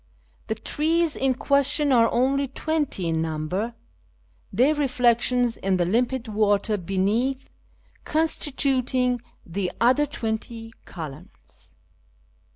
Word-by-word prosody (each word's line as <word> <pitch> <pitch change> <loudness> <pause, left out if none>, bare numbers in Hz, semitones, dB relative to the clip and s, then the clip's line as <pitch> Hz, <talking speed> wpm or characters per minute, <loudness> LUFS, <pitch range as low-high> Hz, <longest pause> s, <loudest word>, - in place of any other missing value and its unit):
The 220 - -1
trees 320 +7 0
in 265 -1 +1
question 280 +2 +2
are 230 -3 +4
only 275 +3 +1
twenty 295 - -2
in 160 -1 0
number, 165 +8 -3 0.8
their 255 +9 +3
reflec 250 -5 +2
tions 245 -2 +1
in 190 -1 0
the 175 - +1
limpid 240 +5 0
water 210 0 +1
beneath 205 +9 -1 0.6
constituting 260 -5 +1 0.2
the 180 +1 -3
other 260 +5 +3
twenty 225 -3 -4
•' - - -29
columns." 160 +1 -11
240 Hz, 110 wpm, -24 LUFS, 200-270 Hz, 0.8 s, are